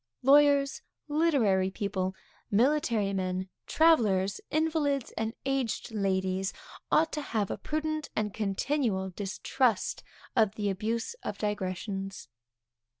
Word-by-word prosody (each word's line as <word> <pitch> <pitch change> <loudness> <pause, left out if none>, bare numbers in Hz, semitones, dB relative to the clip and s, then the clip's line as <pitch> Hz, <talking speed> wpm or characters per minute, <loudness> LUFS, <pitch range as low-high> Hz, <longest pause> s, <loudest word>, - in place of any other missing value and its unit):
Lawyers, 280 0 +5 0.3
literary 275 - +2
people, 190 -1 -2 0.3
military 230 -3 +2
men, 185 0 -2 0.2
travellers, 210 - +3
invalids 305 -4 0
and 225 +1 -2
aged 270 -4 -1
ladies, 190 -2 0 0.4
ought 320 +1 +4
to 300 - -2
have 220 -7 -1
a - - -3
prudent 310 0 -2
and 210 -2 -1
continual 210 -1 -1
distrust 210 +4 0 0.3
of 215 -4 +3
the 205 -2 0
abuse 225 - -2
of 205 - -4
digressions. 195 -1 -3
215 Hz, 105 wpm, -29 LUFS, 195-280 Hz, 0.4 s, Lawyers